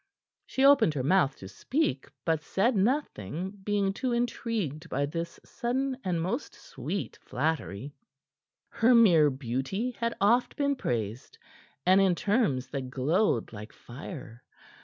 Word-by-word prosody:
She 265 - +1
opened 275 - +6
her 130 - -1
mouth 150 -2 +3
to 95 - -10
speak, 140 - -1 0.2
but 160 -2 +1
said 210 +9 +1
nothing, 190 - -1
being 200 -1 +1
too 250 +4 -2
intrigued 225 - -2
by 140 +2 0
this 165 +3 -5
sudden 260 +3 -2
and 180 -3 0
most 205 - -3
sweet 155 +9 -5
flattery. 140 - -2 0.8
Her 240 +2 +4
mere 170 -10 +6
beauty 135 - -2
had 235 -1 -2
oft 235 +5 +3
been 280 -1 +1
praised, 115 - -3 0.5
and 185 +2 +6
in 190 -2 +3
terms 185 - +1
that 130 -1 -4
glowed 135 - +1
like 105 +1 -8
fire. 125 - -10
175 Hz, 135 wpm, -29 LUFS, -, 0.8 s, opened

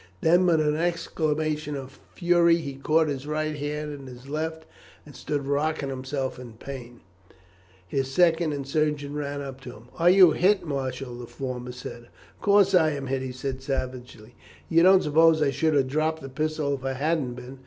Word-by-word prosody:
Then, 175 +3 +4
with 165 -2 +4
an 150 0 +1
exclamation 155 -3 -1
of 135 -1 -8 0.2
fury, 175 -1 +4
he 140 -4 -5
caught 155 +4 +2
his 140 -1 -4
right 155 0 -2
hand 150 +1 -4
in 140 -2 -9
his 125 +1 -12
left, 160 +2 -4 0.4
and 145 -3 -14
stood 140 +2 -3
rocking 145 0 -1
himself 130 0 -4
in 120 -3 -10
pain. 120 0 -9 0.9
His 135 +7 -1
second 165 0 +3
and 140 -2 -4
the - - -12
surgeon 150 -1 0
ran 145 -1 -4
up 135 -1 -8
to 125 -2 -9
him. 115 +2 -16
"Are 170 +1 +5
you 185 -2 +7
hit, 190 +5 +2
Marshall?" 130 -4 -4
the 120 - -8
former 125 -1 -5
said. 120 -1 -9 0.3
"Of - - -31
course 200 -1 +4
I 160 -4 +4
am 140 -1 -5
hit," 135 0 -2
he 130 -1 -4
said 130 +1 -5
savagely. 125 -4 -5 0.4
"You 165 0 +4
don't 190 +1 +6
suppose 160 +2 +4
I 145 -2 +2
should 155 +3 +1
have 135 -2 +3
dropped 155 +3 -1
the 135 - -7
pistol 155 +1 -1
if 135 -2 -5
I 135 0 -1
hadn't 140 -2 -1
been. 125 +2 -10
145 Hz, 195 wpm, -26 LUFS, 130-160 Hz, 0.9 s, you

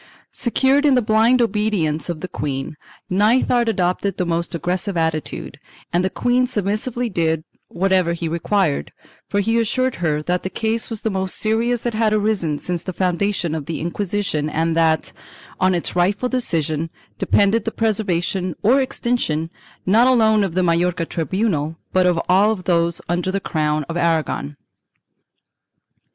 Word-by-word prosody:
Secure 265 +2 +2
in 290 -2 +4
the 250 - +4
blind 225 +3 +4
obedience 200 -8 0
of 170 -3 -4
the 185 - -4
queen, 140 -3 -4 0.3
Nithard 230 +4 +3
adopted 190 0 0
the 180 - 0
most 170 0 -1
aggressive 180 +3 -2
attitude, 160 -2 -2 0.3
and 175 +1 +2
the 190 - +1
queen 245 +4 +1
submissively 225 +2 -1
did 160 -5 0 0.2
whatever 185 -1 +1
he 170 -1 -3
required, 170 0 0 0.4
for 205 - +1
he 225 +3 +1
assured 255 +3 0
her 155 -3 -1
that 180 +2 0
the 190 - -4
case 225 +2 -1
was 225 -3 -3
the 220 - -1
most 190 -1 -2
serious 230 +2 0
that 240 - -2
had 215 -1 +2
arisen 205 -8 0
since 175 +2 -3
the 185 - -5
foundation 185 -2 0
of 155 -3 -4
the 165 - -3
Inquisi 200 +5 -2
tion 150 -3 -1
and 160 +2 0
that, 160 -1 +2 0.5
on 185 0 +3
its 175 - -3
rightful 200 +7 +1
decision, 165 - -1 0.3
depended 205 +2 +2
the 225 - -1
preservation 190 -5 -1
or 255 +6 +5
extinction, 235 - -1 0.3
not 225 +6 +5
alone 220 -4 +4
of 180 -4 -3
the 185 - +2
Majorca 170 0 +1
tribunal, 165 -2 -1 0.2
but 185 -1 +4
of 175 -2 +2
ail 200 +4 +4
those 170 -3 0
under 175 +2 -1
the 195 - -1
crown 155 -4 -1
of 165 - -5
Aragon. 160 -3 0
185 Hz, 160 wpm, -20 LUFS, 165-220 Hz, 0.5 s, or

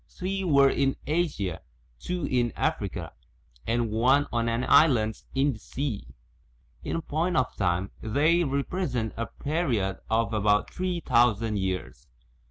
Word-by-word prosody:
Three 195 +1 -3
were 140 -6 +5
in 135 -1 +1
Asia, 145 - -1 0.4
two 180 - -3
in 120 -4 0
Africa, - - -2 0.5
and 115 -1 0
one 130 +6 +3
on 115 0 +1
an 115 +2 -1
island 110 -8 +4
in 135 +1 +2
the 110 - -11
sea. 130 -1 -4 0.8
In 165 - -3
point 165 +4 -1
of 130 -1 0
time 90 0 0
they 155 +10 +2
represent 140 - -2
a 115 - -3
period 125 - -1
of 115 0 +1
about 105 -1 +2
three 180 -2 -2
thousand 115 -5 +2
years. 95 -1 -4
125 Hz, 135 wpm, -27 LUFS, 110-155 Hz, 0.8 s, were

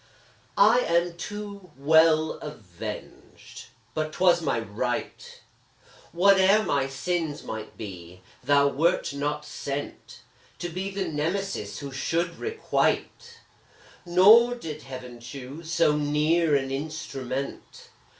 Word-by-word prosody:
I 220 +5 +6
am 170 -4 +1
too 200 0 -7
well 155 +2 +4
avenged! 105 - -9 0.3
but 155 0 -2
'twas 180 -1 +4
my 145 -7 0
right; 115 +3 -4 0.7
Whate'er 195 +4 +5
my 140 -7 0
sins 155 +2 -3
might 110 -1 -7
be, 90 -4 -9 0.2
thou 140 +1 +4
wert 165 +2 +1
not 145 +1 -2
sent 140 +1 -6 0.4
To 175 - -4
be 185 +3 -4
the 195 -1 -3
Nemesis 155 - -2
who 140 -1 -7
should 165 +6 -2
requite 440 0 -1 0.6
Nor 210 +8 +6
did 155 -10 -7
Heaven 125 -2 -9
choose 135 +6 -9
so 165 -3 +3
near 150 +2 +2
an 135 -1 0
instrument. 135 -2 -5
155 Hz, 110 wpm, -26 LUFS, 135-175 Hz, 0.7 s, I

